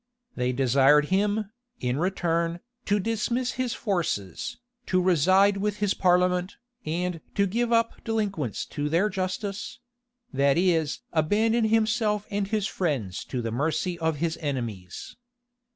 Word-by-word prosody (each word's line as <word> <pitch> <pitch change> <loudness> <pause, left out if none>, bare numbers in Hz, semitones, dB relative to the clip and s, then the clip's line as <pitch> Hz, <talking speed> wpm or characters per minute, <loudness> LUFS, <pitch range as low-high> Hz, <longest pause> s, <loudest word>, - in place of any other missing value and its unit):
They 125 0 0
desired 135 +3 +4
him, 205 +1 +1 0.3
in 125 +1 -1
return, 170 -1 0 0.3
to 205 0 +2
dismiss 230 +4 -1
his 255 -1 -2
forces, 165 - -2 0.3
to 185 - +2
reside 185 +3 +4
with 210 +1 -1
his 205 -2 +1
parliament, 180 0 +2 0.3
and 170 +1 -2
to 200 - +3
give 235 +5 -1
up 230 0 +1
delinquents 200 - -2
to 150 -1 -1
their 175 +7 +2
justice; 195 +2 -4 0.6
that 140 +1 +3
is 165 -4 +1
abandon 220 +9 +2
himself 215 -1 +1
and 200 -1 -1
his 210 -1 0
friends 135 - -2
to 125 -2 -4
the 115 - -2
mercy 160 +7 -1
of 160 -1 0
his 160 +2 -2
enemies. 115 - -5
180 Hz, 135 wpm, -26 LUFS, 150-210 Hz, 0.6 s, desired